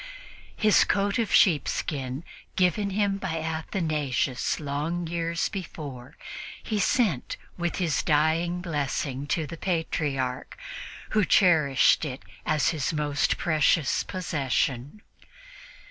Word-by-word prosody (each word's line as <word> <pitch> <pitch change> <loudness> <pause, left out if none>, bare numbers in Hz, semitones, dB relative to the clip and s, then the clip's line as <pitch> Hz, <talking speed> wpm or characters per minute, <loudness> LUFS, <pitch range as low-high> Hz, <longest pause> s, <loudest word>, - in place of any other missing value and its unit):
His 215 -2 +5
coat 200 +2 +1
of 225 - 0
sheepskin, 145 -5 +2 0.3
given 190 +3 +2
him 200 0 0
by 180 -4 -3
Athanasius 155 - -1
long 155 +4 -2
years 170 0 -1
before, 150 -7 -7 0.5
he 215 -2 -1
sent 200 - +1 0.2
with 175 -1 -2
his 165 -7 0
dying 160 +4 +1
blessing 145 -4 -2
to 160 +2 0
the 165 +3 -8
Patriarch, 145 -7 -2 0.5
who 215 -1 +3
cherished 160 -10 +4
it 135 -3 -5 0.2
as 155 -2 +2
his 155 -6 -1
most 150 -2 0
precious 155 -3 +2
possession. 145 - -2
160 Hz, 105 wpm, -26 LUFS, 140-180 Hz, 0.5 s, His